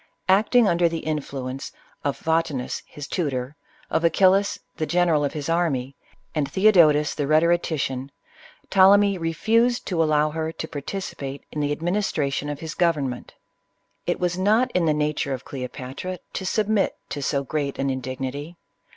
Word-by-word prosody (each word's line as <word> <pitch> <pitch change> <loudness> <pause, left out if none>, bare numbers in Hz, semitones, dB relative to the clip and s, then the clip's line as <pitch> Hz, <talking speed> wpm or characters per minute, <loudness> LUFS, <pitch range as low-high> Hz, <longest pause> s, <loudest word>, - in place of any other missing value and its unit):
Acting 215 +5 +4
under 170 -1 +3
the 165 -1 -5
advice 135 -3 -4 0.3
of 140 -1 -1
Photi 160 -2 0
nus, 125 -1 -4
his 145 - -8
tutor, 140 -5 -2 0.4
of 160 - +1
Achillas, 190 +4 +4 0.2
the 155 - -1
general 170 -4 +2
of 145 - -1
his 150 -2 -4
army, 145 -6 0 0.4
and 145 -3 -1
Thcodotus, 170 -7 +5
the 145 -2 -2
rhetorician, 155 -4 +1 0.6
Ptolemy 195 0 +5
refused 225 +9 +1
to 175 -4 0
allow 155 -1 +2
her 160 0 -2
to 160 - -6
participate 140 -3 -6
in 150 - -4
the 145 0 0
administration 155 -4 -1
of 145 - -3
the 160 -1 -5
government 145 -8 0 0.7
It - - 0
was 180 0 -1
not 215 +6 +3
in 175 -2 +1
the 155 - +4
nature 150 -2 -1
of 130 - -11
Cleopatra 130 +7 -6 0.2
to 190 - -4
submit 215 0 +1
to 145 - -4
so 140 0 0
great 140 0 -2
an 135 0 0
indignity. 130 +5 -5
155 Hz, 150 wpm, -24 LUFS, 140-180 Hz, 0.7 s, Thcodotus